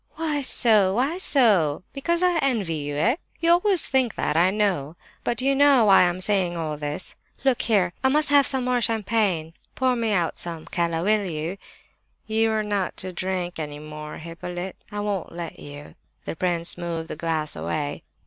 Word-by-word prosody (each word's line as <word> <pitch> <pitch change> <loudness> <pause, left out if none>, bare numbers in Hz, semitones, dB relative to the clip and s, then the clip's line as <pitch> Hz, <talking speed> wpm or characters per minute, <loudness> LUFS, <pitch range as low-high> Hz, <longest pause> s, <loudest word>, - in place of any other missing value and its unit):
"Why 310 -3 -1
so? 215 -7 +3
why 280 +9 0
so? 200 - +3
Because 340 +5 0
I 355 -2 +3
envy 230 - 0
you, 145 -2 -4
eh? 225 - +2 0.2
You 335 0 +3
always 360 +1 +4
think 260 -4 +1
that, 150 - -1
I 175 +3 +4
know. 190 -7 -1 0.3
But 240 - -1
do 255 - 0
you 275 - +4
know 275 -4 +5
why 195 -2 +7
I - - +6
am 175 +1 -1
saying 185 -3 0
all 155 -2 -3
this? 145 0 -4 0.3
Look 265 -3 +2
here! 195 -6 +2
I 265 - +4
must 300 +2 +3
have 285 -2 +5
some 265 -2 +2
more 250 -1 +1
champagne—pour 220 +1 -1
me 230 -2 -1
out 175 -5 0
some, 165 -2 -5
Keller, 170 -1 -1
will 210 +1 +2
you?" 155 +1 -3
"No, - - -7 0.7
you're 220 0 +1
not 205 -3 -2
to 185 0 -5
drink 180 -1 -3
any 150 -2 -5
more, 150 0 -8
Hippolyte. 175 +3 -6 0.2
I 205 0 -3
won't 200 -5 -3
let 170 -1 -7
you." 145 0 -10 0.3
The - - -4
prince 175 0 -2
moved 165 -2 -4
the - - -6
glass 160 -1 -2
away. 85 - -3
190 Hz, 185 wpm, -24 LUFS, 165-245 Hz, 0.7 s, why